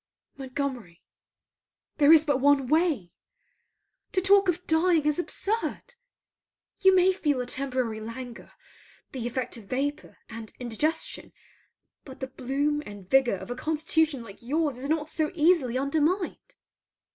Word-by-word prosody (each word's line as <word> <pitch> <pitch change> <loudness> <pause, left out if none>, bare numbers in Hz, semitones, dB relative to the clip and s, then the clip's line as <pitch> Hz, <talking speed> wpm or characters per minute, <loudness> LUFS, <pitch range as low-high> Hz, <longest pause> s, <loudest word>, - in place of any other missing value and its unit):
Montgomery, 255 -9 -5 0.9
there 295 0 +6
is 315 -1 +7
but 285 -4 +1
one 280 0 +4
way. 300 - +1 1.0
To 375 - +3
talk 390 0 +4
of 355 +1 -1
dying 320 -1 +3
is 300 +2 +1
absurd. 445 +6 -3 0.9
You 380 -1 +5
may 370 +1 +5
feel 295 -7 0
a 250 - -2
temporary 250 -4 -2
languor, 235 +2 -8 0.6
the 245 -3 -4
effect 250 0 -3
of 220 - -12
vapour 280 +6 -3
and 225 -1 -9
indigestion; 260 +7 -2 0.7
but 265 -2 -12
the 265 - -3
bloom 280 +3 -1
and 205 -5 -11
vigour 265 -2 +3
of 240 - -8
a - - -3
constitution 315 -1 0
like 205 -3 -12
your's 285 +1 -1
is 275 +2 -5
not 310 -1 0
so 315 -1 -1
easily 305 -7 +3
undermined. 310 +7 -1
280 Hz, 135 wpm, -27 LUFS, 250-320 Hz, 1.0 s, is